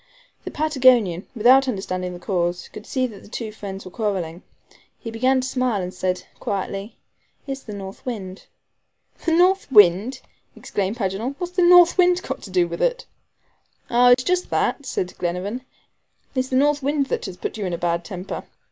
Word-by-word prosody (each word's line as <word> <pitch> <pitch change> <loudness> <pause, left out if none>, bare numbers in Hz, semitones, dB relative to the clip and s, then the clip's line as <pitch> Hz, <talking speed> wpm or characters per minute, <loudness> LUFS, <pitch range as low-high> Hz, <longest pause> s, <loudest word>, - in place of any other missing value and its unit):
The - - -3
Patagonian, 255 - +3
without 255 +4 +5
understanding 185 -5 -3
the 175 - -8
cause, 175 -1 -2
could 210 - -11
see 260 -1 0
that 215 -6 -8
the - - -15
two 220 0 -5
friends 200 -2 -8
were 185 - -9
quarreling. 185 -6 -3 0.6
He 225 - -7
began 255 +3 +2
to 255 - -3
smile, 255 -5 0
and 180 0 -4
said 180 -1 -2
quietly: 195 +2 -4 0.5
"It's 275 -1 -5
the 210 -5 -8
north 195 -1 -8
wind." 195 -6 -6 0.8
"The 330 - +2
north 370 0 +3
wind," 210 +4 +5 0.3
exclaimed 200 +3 -3
Paganel; 215 +5 -2
"what's 355 0 -5
the 360 - +1
north 350 0 +7
wind 360 0 +5
to 265 -6 -6
do 180 -2 +2
with 170 0 -6
it?" - - 0 0.9
"Ah, 245 +1 +5
it 245 +1 +6
is - - -10
just 360 0 0
that," 285 - 0
said 185 -8 -3
Glenarvan. 180 +7 -2 0.7
"It's 260 -1 0
the 260 - -2
north 290 +2 +3
wind 285 +1 +1
that - - -2
has 185 -2 -8
put - - -5
you 205 -3 -2
in 180 - -3
a - - -1
bad 170 0 -1
temper. 185 +1 -6
220 Hz, 185 wpm, -22 LUFS, 185-265 Hz, 0.9 s, north